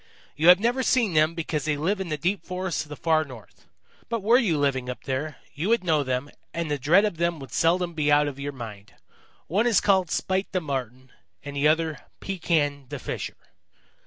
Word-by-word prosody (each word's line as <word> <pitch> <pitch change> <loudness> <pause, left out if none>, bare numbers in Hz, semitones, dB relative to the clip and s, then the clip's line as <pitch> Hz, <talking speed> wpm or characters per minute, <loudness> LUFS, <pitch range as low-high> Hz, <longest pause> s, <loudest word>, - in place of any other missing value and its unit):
"You 160 - +1
have 180 +1 +9
never 240 +4 +1
seen 240 -7 +2
them 155 +1 +3
because 155 -3 -3
they 150 -2 0
live 190 +7 0
in 185 - -4
the 155 - -1
deep 180 +6 -1
forests 185 -1 -3
of 150 - -9
the 150 - -6
Far 160 +1 +2
North. 125 -9 -14 0.4
But 230 -4 -2
were 235 +4 +5
you 185 - +1
living 135 -3 0
up 125 - -6
there, 145 +3 -3 0.2
you 160 +8 -2
would 230 -3 +3
know 160 -4 +2
them, 130 +1 -2 0.2
and 165 -2 -2
the 145 - -1
dread 170 +10 +4
of 205 -6 -2
them 170 0 0
would 135 -4 -10
seldom 175 +1 +2
be 150 -2 +1
out 145 0 +4
of 140 -1 -6
your 140 +1 -3
mind. 110 -6 -10 0.5
One 205 +9 +1
is 230 - +4
called 190 -4 +2
Spite 190 +4 -1
the 185 - +2
Marten 130 -4 -5 0.3
and 145 0 -7
the 140 +1 +3
other 160 0 +1 0.2
Pekan 155 -7 -1
the - - -4
Fisher. - - -5
155 Hz, 215 wpm, -25 LUFS, 140-185 Hz, 0.5 s, have